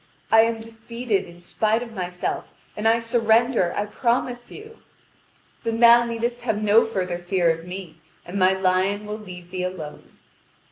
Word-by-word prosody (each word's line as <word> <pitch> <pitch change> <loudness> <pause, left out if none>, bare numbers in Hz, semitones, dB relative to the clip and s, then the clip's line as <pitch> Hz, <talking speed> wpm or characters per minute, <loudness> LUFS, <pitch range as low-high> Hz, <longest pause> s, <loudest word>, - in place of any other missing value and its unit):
I 225 - +8
am 230 -1 -2
defeated 225 -1 -3
in 175 0 -15
spite 220 +5 0
of 230 -2 -10
myself, 180 -3 -3 0.3
and 210 +1 0
I 225 +1 +5
surrender, 230 -3 +2
I 205 - -1
promise 240 +2 -1
you." 440 +2 -12 0.8
"Then 230 -1 -2
thou 235 0 +7
needest 235 +1 -3
have 220 -4 -1
no 215 +2 +4
further 180 -5 -2
fear 175 -1 +1
of 165 +1 -6
me, 180 -3 -8 0.3
and 185 +3 -4
my 185 0 +5
lion 190 +2 +1
will 210 +1 -5
leave 180 -4 -11
thee 185 -1 -3
alone." 180 -5 -7
215 Hz, 160 wpm, -23 LUFS, 185-230 Hz, 0.8 s, I